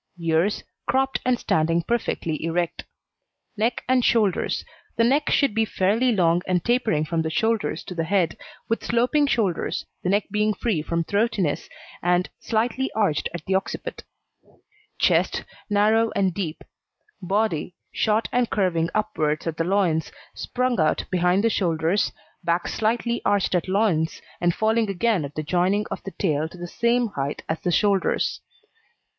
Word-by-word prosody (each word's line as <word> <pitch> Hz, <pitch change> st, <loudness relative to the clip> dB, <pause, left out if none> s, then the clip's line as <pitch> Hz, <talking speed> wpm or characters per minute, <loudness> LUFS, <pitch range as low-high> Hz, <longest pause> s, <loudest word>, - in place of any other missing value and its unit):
EARS 165 Hz, +4 st, +1 dB, 0.2 s
Cropped 265 Hz, 0 st, +1 dB
and 250 Hz, -1 st, +2 dB
standing 165 Hz, +2 st, +1 dB
perfectly 165 Hz, -9 st, -2 dB
erect. 170 Hz, +1 st, -1 dB, 0.7 s
NECK 230 Hz, +3 st, 0 dB
AND 255 Hz, -1 st, +3 dB
SHOULDERS 215 Hz, -6 st, +1 dB, 0.3 s
The 230 Hz, -, +3 dB
neck 275 Hz, +5 st, +2 dB
should 280 Hz, -6 st, +3 dB
be 225 Hz, +1 st, +2 dB
fairly 220 Hz, +4 st, +1 dB
long 175 Hz, -4 st, +3 dB
and 180 Hz, -2 st, 0 dB
tapering 235 Hz, -11 st, +1 dB
from 165 Hz, +1 st, -1 dB
the 160 Hz, -, -1 dB
shoulders 220 Hz, -1 st, 0 dB
to -, -, -7 dB
the 165 Hz, -2 st, -1 dB
head, 175 Hz, -2 st, +1 dB, 0.3 s
with 225 Hz, -, -1 dB
sloping 250 Hz, +5 st, +2 dB
shoulders, 210 Hz, -, 0 dB, 0.2 s
the 180 Hz, -, -1 dB
neck 200 Hz, +2 st, +3 dB
being 210 Hz, 0 st, +1 dB
free 200 Hz, -6 st, 0 dB
from 170 Hz, +2 st, -1 dB
throatiness, 200 Hz, -5 st, 0 dB, 0.3 s
and 180 Hz, +1 st, +2 dB
slightly 240 Hz, +4 st, -1 dB
arched 200 Hz, -9 st, +1 dB
at 175 Hz, -3 st, -7 dB
the 190 Hz, -, 0 dB
occiput. 190 Hz, +1 st, -3 dB, 0.9 s
CHEST -, -, +2 dB, 0.3 s
Narrow 215 Hz, +2 st, +3 dB
and 190 Hz, -2 st, +2 dB
deep. 170 Hz, -4 st, -4 dB, 0.6 s
BODY 185 Hz, -3 st, -1 dB, 0.2 s
Short 220 Hz, 0 st, +1 dB
and 245 Hz, -1 st, +1 dB
curving 170 Hz, -5 st, +1 dB
upwards 160 Hz, -8 st, 0 dB
at 165 Hz, -2 st, -3 dB
the 165 Hz, -, +1 dB
loins, 175 Hz, -3 st, +1 dB, 0.2 s
sprung 250 Hz, -2 st, -1 dB
out 155 Hz, -1 st, +2 dB
behind 180 Hz, +2 st, +2 dB
the 230 Hz, -, +4 dB
shoulders, 170 Hz, +2 st, +1 dB, 0.3 s
back 170 Hz, +1 st, 0 dB
slightly 235 Hz, +2 st, 0 dB
arched 200 Hz, -2 st, +1 dB
at 180 Hz, 0 st, +1 dB
loins, 185 Hz, -5 st, +1 dB, 0.2 s
and 175 Hz, -1 st, +2 dB
falling 220 Hz, 0 st, +1 dB
again 195 Hz, -2 st, +1 dB
at 140 Hz, -, -9 dB
the 155 Hz, -, -2 dB
joining 185 Hz, +6 st, +1 dB
of -, -, -4 dB
the 195 Hz, -, -7 dB
tail 155 Hz, -4 st, 0 dB
to 180 Hz, -, -13 dB
the 175 Hz, -, -6 dB
same 235 Hz, +4 st, +1 dB
height 140 Hz, -5 st, -4 dB
as 160 Hz, 0 st, -2 dB
the 175 Hz, -, -1 dB
shoulders. 200 Hz, +2 st, +1 dB
195 Hz, 155 wpm, -24 LUFS, 170-225 Hz, 0.9 s, the